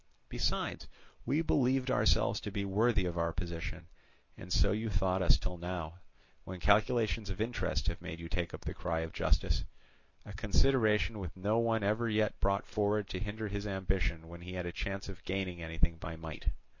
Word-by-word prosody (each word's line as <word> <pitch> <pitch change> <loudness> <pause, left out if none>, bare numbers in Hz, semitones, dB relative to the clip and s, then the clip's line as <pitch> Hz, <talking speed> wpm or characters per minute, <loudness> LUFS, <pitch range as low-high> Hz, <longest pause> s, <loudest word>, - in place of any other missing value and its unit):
Besides, - - -1 0.4
we 145 +6 +2
believed 130 -3 +2
ourselves - - +3
to - - -5
be 100 - -2
worthy 105 0 +3
of 85 -1 -2
our 85 0 +1
position, 85 0 -5 0.5
and 90 - -10
so 100 - +4
you 110 +2 -1
thought 95 -1 +1
us 90 - +5
till 90 -1 -4
now, 85 -1 -4 0.4
when 95 0 -7
calculations 110 +2 +3
of 95 - -4
interest 115 +3 -1
have - - -2
made 80 - -6
you 85 - -6
take 85 0 -2
up - - -7
the - - -4
cry 80 -1 -1
of 80 0 -5
justice—a 105 - -2
consideration 110 +1 +3
which 90 -3 -6
no 105 +5 +2
one 115 -2 +2
ever 110 +3 +1
yet 110 +1 +1
brought 100 +1 +1
forward 105 -1 +1
to 90 - -3
hinder 105 +2 -3
his 100 +1 -3
ambition 95 -4 -1
when 85 +1 -10
he 90 +1 -7
had 90 -1 -3
a 85 - -2
chance 100 +2 -4
of 95 -1 -9
gaining 95 -2 -2
anything 80 0 0
by 80 0 -6
might. 80 -1 -8
95 Hz, 185 wpm, -33 LUFS, 85-105 Hz, 0.5 s, us